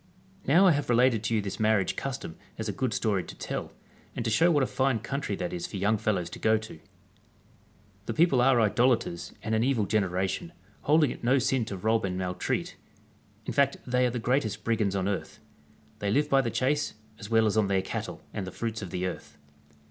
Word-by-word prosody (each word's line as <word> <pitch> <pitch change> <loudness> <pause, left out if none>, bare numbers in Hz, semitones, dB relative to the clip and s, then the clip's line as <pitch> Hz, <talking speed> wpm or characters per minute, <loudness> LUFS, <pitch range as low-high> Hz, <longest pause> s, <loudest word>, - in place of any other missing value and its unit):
Now 170 +8 +6
I 185 - +7
have 145 -3 -1
related 120 -2 +4
to 115 - +1
you 105 - +1
this 100 -1 -5
marriage 110 -4 +2
custom 135 -11 -5 0.2
as - - -4
a - - 0
good 130 -3 -2
story 100 -3 0
to - - -10
tell, - - -5 0.4
and 120 - -3
to 110 - 0
show 165 +10 +4
what 145 -5 +3
a - - +3
fine 130 -1 +1
country 125 -1 -3
that 90 - -4
is 85 -1 -3
for - - -6
young 105 +3 +1
fellows 95 -6 0
to - - -8
go 110 0 +3
to 110 0 -8
I 80 - -13 1.3
The 115 - -3
people 155 -7 +4
are 130 -1 +4
Idolaters 110 -4 +1
and 110 +1 -2
an 110 +1 +2
evil 125 -5 +1
generation, 95 - -1 0.3
holding 150 -1 +3
it - - -9
no 125 +3 +4
sin 130 -2 +1
to 100 -3 -5
rob 110 +3 +1
and 90 -1 -2
maltreat; 90 -1 -2 0.7
in - - -3
fact 140 -1 +2
they 125 0 +2
are - - 0
the 120 - -3
greatest 110 -3 0
brigands 110 -4 0
on 95 0 0
earth. 100 -2 -4 0.6
They 100 - -1
live 145 +7 +2
bv 135 -2 +3
the - - +1
chase, 145 +5 0 0.2
as 105 -2 -8
well 110 -1 +4
as 105 - +1
on 110 -2 +3
their 95 -1 +1
cattle - - -5
and 95 -3 -4
the - - -5
fruits 115 -1 -4
of 95 - -6
tiie 90 +2 -2
earth. 90 - -8
110 Hz, 220 wpm, -28 LUFS, 100-130 Hz, 1.3 s, I